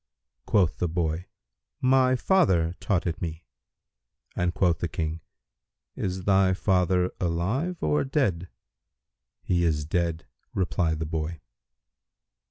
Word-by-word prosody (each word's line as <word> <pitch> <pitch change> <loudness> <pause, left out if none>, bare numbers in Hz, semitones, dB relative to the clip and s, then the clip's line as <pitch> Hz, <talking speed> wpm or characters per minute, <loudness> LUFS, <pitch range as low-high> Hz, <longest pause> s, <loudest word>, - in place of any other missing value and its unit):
Quoth 80 -9 +2
the 90 - +1
boy, 80 0 -2 0.5
"My 130 0 +4
father 95 - +3
taught 95 -5 0
it 85 -2 -3
me;" 80 -1 -4 0.9
and 90 0 +1
quoth 90 -2 +1
the 85 - -1
King, 80 0 -3 0.7
"Is 95 0 -3
thy 95 -1 +3
father 90 -1 +2
alive 100 - -1
or 75 -1 +2
dead?" 100 - 0 0.9
"He 85 -1 +1
is 75 -3 +1
dead," 85 0 -1 0.3
replied 90 -3 0
the 80 - -3
boy. 80 0 -3
90 Hz, 115 wpm, -26 LUFS, 80-95 Hz, 0.9 s, My